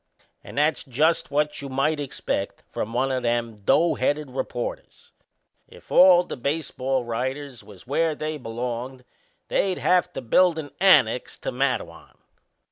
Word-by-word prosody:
"And -, -, -11 dB
that's 150 Hz, +1 st, +2 dB
just 150 Hz, +6 st, +1 dB
what 150 Hz, +1 st, -1 dB
you 140 Hz, -, -6 dB
might 140 Hz, +4 st, 0 dB
expect 140 Hz, -3 st, -4 dB
from 110 Hz, -, -4 dB
one 130 Hz, +3 st, 0 dB
o' 130 Hz, -, 0 dB
them 120 Hz, -2 st, -1 dB
doughheaded 145 Hz, +5 st, +1 dB
reporters. -, -, -5 dB, 0.6 s
If -, -, -17 dB
all 180 Hz, -1 st, +7 dB
the -, -, -6 dB
baseball 135 Hz, -1 st, -2 dB
writers 130 Hz, +2 st, -4 dB
was 100 Hz, -3 st, -15 dB
where 155 Hz, +4 st, 0 dB
they 155 Hz, 0 st, -4 dB
belonged 125 Hz, +2 st, -5 dB, 0.4 s
they'd 190 Hz, -2 st, 0 dB
have 180 Hz, -1 st, +2 dB
to -, -, -5 dB
build 170 Hz, +8 st, +3 dB
an 145 Hz, -3 st, -6 dB
annex 135 Hz, -, +4 dB
to -, -, -3 dB
Matteawan." 125 Hz, -10 st, -3 dB
135 Hz, 140 wpm, -24 LUFS, 125-155 Hz, 0.6 s, all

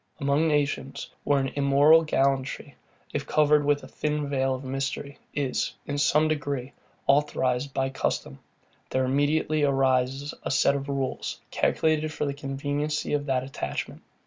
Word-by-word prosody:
Among 140 Hz, +2 st, +2 dB
nations, 145 Hz, -2 st, -1 dB
where 145 Hz, -, +3 dB
an 135 Hz, 0 st, -1 dB
immoral 145 Hz, +3 st, +5 dB
gallantry, 135 Hz, -2 st, 0 dB, 0.4 s
if 145 Hz, 0 st, -3 dB
covered 150 Hz, -1 st, +4 dB
with 145 Hz, 0 st, +1 dB
a -, -, -9 dB
thin 150 Hz, -1 st, -2 dB
veil 135 Hz, -1 st, 0 dB
of 130 Hz, -, -8 dB
mystery, 135 Hz, +1 st, -4 dB, 0.2 s
is, 140 Hz, -3 st, -1 dB
in 145 Hz, 0 st, -3 dB
some 150 Hz, +1 st, +4 dB
degree, 145 Hz, -4 st, -2 dB, 0.3 s
authorized 140 Hz, -2 st, +1 dB
by 135 Hz, 0 st, -1 dB
custom, 70 Hz, -, -2 dB, 0.5 s
there 130 Hz, 0 st, +1 dB
immediately 150 Hz, +3 st, +1 dB
arise 135 Hz, 0 st, +1 dB
a -, -, -4 dB
set 135 Hz, -, +3 dB
of 140 Hz, 0 st, -4 dB
rules, 135 Hz, -2 st, -3 dB
calculated 155 Hz, -1 st, +1 dB
for 150 Hz, -, -2 dB
the 140 Hz, -, -1 dB
conveniency 145 Hz, +2 st, -2 dB
of 145 Hz, 0 st, -1 dB
that 130 Hz, -1 st, +1 dB
attachment. 130 Hz, -, -5 dB
140 Hz, 145 wpm, -26 LUFS, 135-145 Hz, 0.5 s, immoral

